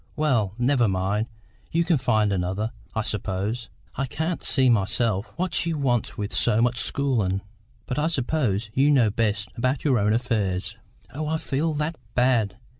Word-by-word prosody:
Well, 120 -10 +1
never 125 -1 +3
mind, 100 +3 0 0.4
you 170 +1 +2
can 165 -4 +2
find 110 -5 +2
another, 95 +4 -1 0.2
I 110 - 0
suppose. 105 +3 -3 0.2
I 135 0 -2
can't 160 +6 -2
see 130 -3 +3
myself 105 -1 +2
what 185 +1 -2
she 165 -1 +1
wants 125 -5 0
with 105 -1 -4
so 105 - +2
much 120 +1 +2
schoolin', 115 -8 0 0.4
but 125 - -2
I 150 - +2
suppose 120 - 0
you 135 +4 +4
know 125 -7 +4
best 105 -1 0
about 130 +3 0
your 130 -6 +3
own 105 +1 +2
affairs." 110 -6 -1 0.4
"Oh, 155 +2 -3
I 160 +1 0
feel 155 +1 -1
that 150 +2 -2 0.2
bad! 120 -5 +2
120 Hz, 165 wpm, -25 LUFS, 105-140 Hz, 0.4 s, you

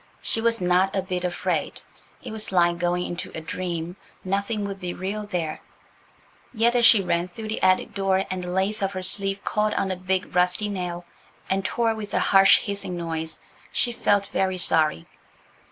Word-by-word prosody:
She 225 - 0
was 230 0 +2
not 180 +2 +2
a 190 - 0
bit 180 -1 -3
afraid. 180 -1 -2 0.4
It - - -6
was 220 -2 -2
like 175 -2 +3
going 175 +1 0
into 175 0 -5
a - - -3
dream. 170 +1 -4 0.3
Nothing 200 +3 -1
would 195 -1 -5
be 180 -2 -4
real 205 +3 -4
there. 170 -6 -3 0.9
Yet 235 +1 +2
as 240 -1 +6
she 210 -3 +6
ran 175 0 0
through 215 +4 -8
the 220 - -3
attic 185 0 +2
door 195 -1 +1
and 185 -1 -3
the 180 - -5
lace 190 +4 0
of 195 0 -1
her 185 -1 -4
sleeve 195 +1 0
caught 210 0 0
on 190 - 0
a - - -1
big 185 0 -2
rusty 180 +4 +2
nail 175 -3 -4 0.5
and 195 0 +1
tore 225 +3 +1
with 215 -2 -6
a - - +3
harsh 195 0 +6
hissing 200 -3 -4
noise, 160 -1 -4 0.3
she 240 - +1
felt 205 -3 +1
very 190 -1 -1
sorry. 155 - +3
190 Hz, 185 wpm, -24 LUFS, 180-205 Hz, 0.9 s, as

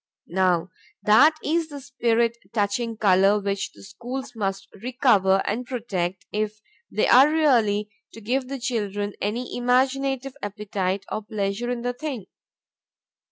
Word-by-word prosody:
Now 185 -1 +2 0.3
that 280 +9 +6
is 325 +1 0
the 290 -1 -7
spirit 235 -4 +1 0.2
touching 225 +2 -1
color 195 0 +4
which 200 -1 -2
the - - -16
schools 245 +6 -7
must 195 -2 -3
recover 215 -6 +3
and 230 +5 -1
protect 190 -8 -3
if 215 0 -2 0.3
they 215 - +1
are 265 +4 +7
really 225 -10 +2 0.2
to - - -10
give 250 +4 -1
the 275 +1 -4
children 205 -5 -2
any 230 +5 -2
imaginative 265 +2 +1
appetite 200 -2 -3
or 215 - -2
pleasure 210 +2 -3
in 245 -1 -3
the 245 0 -1
thing. 255 -6 -5
225 Hz, 135 wpm, -24 LUFS, 200-250 Hz, 0.3 s, are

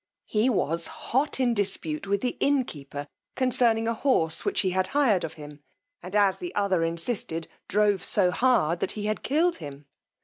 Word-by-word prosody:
He 220 +4 +1
was 170 - -1
hot 270 +3 -1
in 250 -2 +2
dispute 195 -5 -2
with 200 0 0
the 250 - -1
innkeeper 145 - -1 0.3
concerning 235 -3 +2
a 230 - +1
horse 190 - +1
which - - +1
he 185 - 0
had 185 0 0
hired 225 -11 +3
of 160 - -4
him, 150 -2 -11 0.4
and, 180 +3 -7
as 200 -2 +3
the 350 -1 -6
other 195 -4 +1
insisted, 165 0 -3 0.2
drove 205 -2 +2
so 185 -3 +3
hard 180 -9 +2
that - - -2
he 210 -1 -5
had 215 0 -1
killed 335 +5 +1
him. 145 -1 -9
200 Hz, 175 wpm, -26 LUFS, 165-245 Hz, 0.4 s, hired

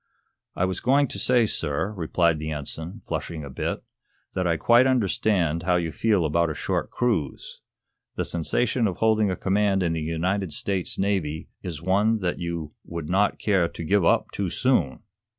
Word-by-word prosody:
"I 90 - +1
was 95 -1 -2
going 140 +2 +3
to - - -5
say, 125 -2 +3
sir," 80 -1 -1
replied 85 -3 +1
the 80 0 -4
Ensign, 80 +6 -5
flushing 80 0 -4
a 70 - -8
bit, - - -3 0.5
"that 90 -1 0
I 85 -1 +2
quite 120 +8 +5
understand 95 -8 +1
how 90 +1 +2
you 85 -2 0
feel 100 +1 +1
about 85 +2 +2
a 75 - -4
short - - -2
cruise. 105 - -2 0.5
The - - -1
sensation 105 - 0
of 95 - -3
holding 110 -2 +3
a 95 - -1
command 100 0 +1
in 85 -2 0
the 80 - -2
United 85 +3 -1
States 95 +2 -2
Navy 90 -6 -1
is 85 -4 -6
one 100 +5 +3
that 90 -2 -1
you 85 -3 -4
would 85 -3 -6
not 100 +2 +2
care 95 -5 +2
to 85 - -8
give 100 +4 +2
up 85 - +2
too 100 -3 -2
soon." 110 - +1
90 Hz, 180 wpm, -25 LUFS, 80-105 Hz, 0.5 s, quite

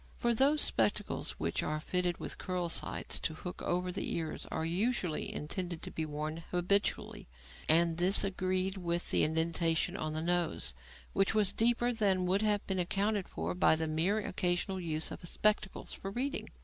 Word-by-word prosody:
For 235 0 +1
those 280 +6 +4
spectacles 110 -2 0
which 85 +1 -2
are 155 0 -2
fitted 180 +2 -1
with - - -7
curl 180 -2 -2
sides - - -1
to 160 - -3
hook 180 +2 -7
over 180 +1 -1
the 190 - -2
ears 160 -2 -4
are 160 - -2
usually 180 -1 0
intended 170 +2 -3
to - - -4
be 160 -1 -3
worn 155 +1 -4
habitually, 185 +3 +1 0.4
and 165 +1 +4
this 180 +3 +5
agreed 185 0 0
with 175 -1 -1
the - - +4
indentation 160 +1 +1
on 155 0 -3
the 155 - -2
nose; 175 - 0 0.4
which 195 +2 +2
was 205 -3 +3
deeper 240 +1 +3
than 195 -5 +2
would 190 +3 +2
have 210 -1 +1
been 190 -1 -1
accounted 200 +3 0
for 80 +2 -3
by 90 - +4
the 160 0 -2
merely 170 +7 +1
occasional 180 +1 -1
use 160 -2 -1
of - - -8
spectacles 210 -2 0
for 195 - -6
reading. 265 +8 -2
180 Hz, 175 wpm, -32 LUFS, 160-200 Hz, 0.4 s, this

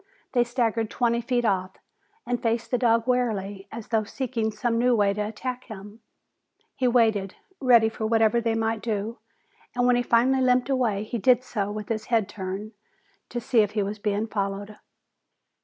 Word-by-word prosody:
They 245 -2 +3
staggered 230 -2 -1
twenty 235 -1 +1
feet 240 0 0
off 190 -3 0 0.5
and 245 -1 -2
faced 230 0 -1
the 250 - +1
dog 230 -2 +3
warily, 205 -6 -1
as 230 -1 -8
though 220 -2 +2
seeking 230 0 -2
some 230 +2 -1
new 245 0 +3
way 200 -2 +3
to 210 - -3
attack 245 +4 -4
him. 210 0 -10 0.8
He 255 - +1
waited, 220 -5 +2 0.2
ready 240 -4 +5
for 220 0 -3
whatever 225 +1 +3
they 225 -1 0
might 225 -1 -1
do, 220 +1 -3 0.6
and 245 0 +2
when 250 0 +4
he 245 - +2
finally 245 +3 +3
limped 250 0 +2
away 230 -6 +1
he 230 +2 -4
did 250 +4 +4
so 205 -5 -3
with 210 0 -6
his 215 -1 -2
head 225 -4 +1
turned 200 +1 -6 0.6
to 240 - -3
see 240 0 +1
if 210 -1 +2
he 210 -2 +1
was 205 +2 -4
being 210 +1 -1
followed. 200 -1 -3
225 Hz, 180 wpm, -25 LUFS, 210-245 Hz, 0.8 s, ready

